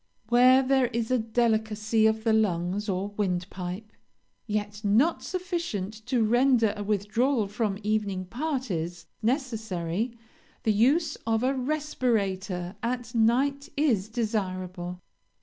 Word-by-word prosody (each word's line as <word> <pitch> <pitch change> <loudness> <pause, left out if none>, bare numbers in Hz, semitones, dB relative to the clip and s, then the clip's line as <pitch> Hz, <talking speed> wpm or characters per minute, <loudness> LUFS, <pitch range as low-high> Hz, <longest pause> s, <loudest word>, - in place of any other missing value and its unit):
Where 255 +2 +6
there 265 -1 +3
is 230 -1 -2
delicacy 220 -2 +2
of 220 0 0
the 225 -1 +3
lungs 200 -1 0
or 190 +1 -1
windpipe, 185 +1 -3 0.6
yet 210 0 -3
not 230 +12 +3
sufficient 340 - -3
to 250 -3 +2
render 240 -1 +3
a 205 - -4
withdrawal 215 +4 +1
from 205 -1 -1
evening 205 -3 -1
parties 190 - -3 0.2
necessary, 225 - -2 0.5
the 220 - +3
use 285 +9 +3
of 225 +1 +1
a 260 +2 +2
respirator 220 -10 -1
at 240 0 -3
night 270 +6 +2
is 230 -9 +2
desirable. 185 -6 -3
220 Hz, 115 wpm, -27 LUFS, 200-250 Hz, 0.6 s, Where